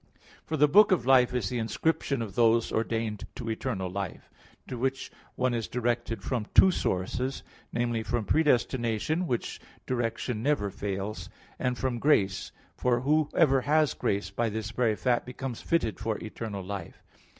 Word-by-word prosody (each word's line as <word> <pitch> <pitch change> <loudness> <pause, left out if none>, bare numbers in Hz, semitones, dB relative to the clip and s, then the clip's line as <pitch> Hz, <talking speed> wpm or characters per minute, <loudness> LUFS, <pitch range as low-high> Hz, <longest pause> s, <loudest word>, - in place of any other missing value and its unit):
For 160 - -1
the 150 +1 +6
book 205 +8 +6
of 175 -10 +2
life 130 -2 +5
is 125 -6 -1
the 125 - -2
inscription 120 +3 0
of 105 -4 -7
those 115 +1 +3
ordained 110 -2 -2
to 115 -3 -4
eternal 110 -5 -2
life, 95 0 -6 0.4
to - - -5
which 130 +2 -2 0.2
one 130 -1 +1
is 115 -2 -2
directed 120 -1 -2
from 120 -5 -2
two 190 - +8
sources; 125 - -2 0.3
namely, 120 -1 0
from 115 0 -2
predestination, 130 - +1
which 120 -4 -3 0.2
direction 120 -2 -2
never 120 -7 +1
fails, 100 +1 -4 0.3
and 125 -1 0
from 125 -2 -1
grace; 100 -9 +2 0.2
for 125 -1 +1
whoever 150 -1 +3
has 150 0 +2
grace, 100 +1 -1
by 115 -1 0
this 110 0 -4
very 115 -2 +1
fact 120 +1 +1
becomes 125 -1 -6
fitted 115 - 0
for 110 -1 -1
eternal 110 -3 -6
life. 100 +1 -7
120 Hz, 155 wpm, -28 LUFS, 110-130 Hz, 0.4 s, two